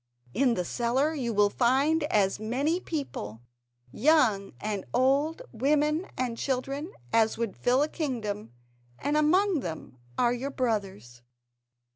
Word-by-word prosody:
In 250 -2 +2
the 180 - -2
cellar 255 - 0
you 255 -6 -2
will 205 -1 +3
find 275 +7 +2
as 200 -8 +1
many 270 +10 0
people, 120 - -5 0.5
young 235 - +3
and 205 -2 -3
old, 275 +5 +2
women 300 - +1
and 245 -2 -2
children, 275 +3 -2 0.2
as 220 -1 +3
would 230 -3 -2
fill 255 +3 +2
a - - 0
kingdom, 225 - -4 0.5
and 290 +2 -1
among 350 +4 +3
them 160 - -7 0.2
are 240 0 +3
your 255 +3 -3
brothers." 200 - -3
255 Hz, 130 wpm, -28 LUFS, 215-295 Hz, 0.5 s, will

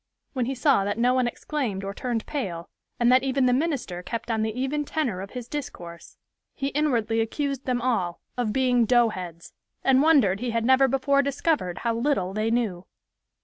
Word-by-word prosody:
When 255 -4 -1
he 270 - -2
saw 255 -4 +3
that 205 +2 -2
no 245 +2 +3
one 255 -1 +2
exclaimed 240 -6 -3
or 195 0 -4
turned 235 0 -3
pale, 185 - -4 0.3
and 240 0 +4
that 255 +1 +6
even 270 0 +1
the 250 - +3
minister 260 - -1
kept 230 +5 -4
on 220 -1 0
the 220 +2 -2
even 285 +3 -1
tenor 260 -11 -2
of 195 - -7
his 240 -2 -6
discourse, 175 - -7 0.4
he 275 0 -2
inwardly 240 -6 +1
accused 275 +4 -2
them 245 -2 -1
all 190 -9 0 0.2
of 245 -4 -1
being 250 -1 +2
"doughheads," 190 -9 0 0.3
and 265 0 +4
wondered 270 - +4
he 245 +1 -2
had 230 0 -1
never 260 +2 +5
before 275 +2 +2
discovered 280 - -1
how 230 - +2
little 230 -6 0
they 215 +2 0
knew. 215 -7 -1
245 Hz, 190 wpm, -25 LUFS, 215-270 Hz, 0.4 s, that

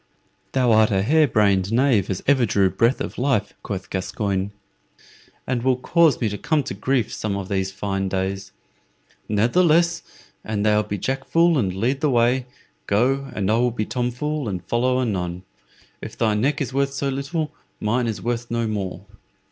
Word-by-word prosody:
"Thou 125 -3 +3
art 110 -1 +5
a 95 -1 +1
hare 155 +6 +4
brained 100 -4 +2
knave 115 -5 +2
as 95 -2 -3
ever 135 -3 +4
drew 100 -4 +2
breath 115 +3 +1
of - - -5
life," 125 -6 0
quoth 95 -2 -6
Gascoyne, 95 0 -2 1.0
"and 125 -2 -1
will 130 +1 +2
cause 165 +4 +3
me 115 - 0
to 105 - -5
come 150 -1 +1
to - - -5
grief 120 +3 -1
some 105 -2 -2
of 95 -1 -6
these 95 -1 -1
fine 95 -1 -2
days. 95 +1 -3 0.8
Ne'theless, 170 - +3 0.4
an 105 -2 -2
thou 105 0 +3
be 105 -1 -4
Jack 135 +5 -2
Fool 170 0 +3
and 105 -10 +1
lead 125 +8 -1
the 150 - +2
way, 125 +1 +2 0.4
go, 135 +6 +1
and 100 0 0
I 110 - +3
will 125 +1 +3
be 110 -2 -3
Tom 125 +1 -1
Fool 150 +1 -3
and 90 -3 -5
follow 125 +2 +1
anon. 90 -7 -2 0.6
If - - -8
thy 110 -2 +2
neck 135 +8 0
is 130 -2 -3
worth 140 0 0
so 140 0 -2
little, 140 +4 -3 0.3
mine 120 +3 0
is 110 - -4
worth 120 0 -2
no 115 0 -1
more." 100 -4 -4
115 Hz, 180 wpm, -22 LUFS, 100-135 Hz, 1.0 s, art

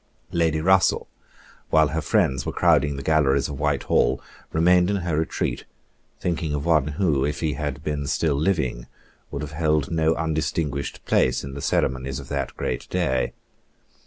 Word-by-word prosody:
Lady 80 -2 +1
Russell, 95 +3 +3 0.6
while 80 -1 +4
her 80 +1 -1
friends 65 -3 +1
were - - -3
crowding 75 -1 +3
the 70 - -6
galleries 70 -3 +2
of 70 -2 -6
Whitehall, 75 -2 +1 0.3
remained 90 +3 +4
in 100 - +1
her 85 -3 0
retreat, 80 +1 -2 0.5
thinking 80 -4 -1
of 70 - -3
one 80 -4 +3
who, 80 -9 +2
if 75 +2 -1
he 80 -2 0
had - - -4
been 75 -2 -2
still 75 +2 +1
living, 70 -6 -1 0.4
would 70 - -5
have 75 - -6
held 75 -2 0
no 80 0 +2
undistinguished 75 -3 -2
place 65 0 +2
in 70 0 -7
the 70 - -6
ceremonies 65 -1 0
of - - -10
that 70 -2 -3
great - - -3
day. 80 -8 0
75 Hz, 160 wpm, -24 LUFS, 70-80 Hz, 0.6 s, while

